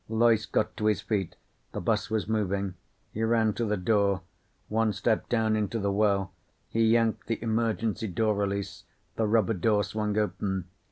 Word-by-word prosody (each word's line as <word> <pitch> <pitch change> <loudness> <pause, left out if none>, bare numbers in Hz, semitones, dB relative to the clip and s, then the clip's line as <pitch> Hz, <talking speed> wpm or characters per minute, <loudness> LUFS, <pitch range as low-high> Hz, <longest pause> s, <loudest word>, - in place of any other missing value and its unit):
Loyce 110 -1 +3
got 110 - 0
to 105 - 0
his 105 - +2
feet. 100 -5 -2 0.4
The - - -3
bus - - 0
was 110 -2 -1
moving. 100 -3 -1 0.4
He 110 - -4
ran 110 -1 +2
to 120 - -2
the 105 -1 0
door. 100 0 +2 0.5
One 110 0 +1
step 110 +3 0
down 110 -2 +2
into 105 +1 -1
the 100 -2 0
well. 100 -2 +1 0.4
He 115 0 +2
yanked 115 -1 +2
the 115 - -1
emergency 115 -1 0
door 110 +3 +1
release. 100 -1 -3 0.3
The 110 - +1
rubber 110 0 +3
door 105 +1 +2
swung 105 +1 -2
open. 95 -3 -1
110 Hz, 170 wpm, -28 LUFS, 100-110 Hz, 0.5 s, Loyce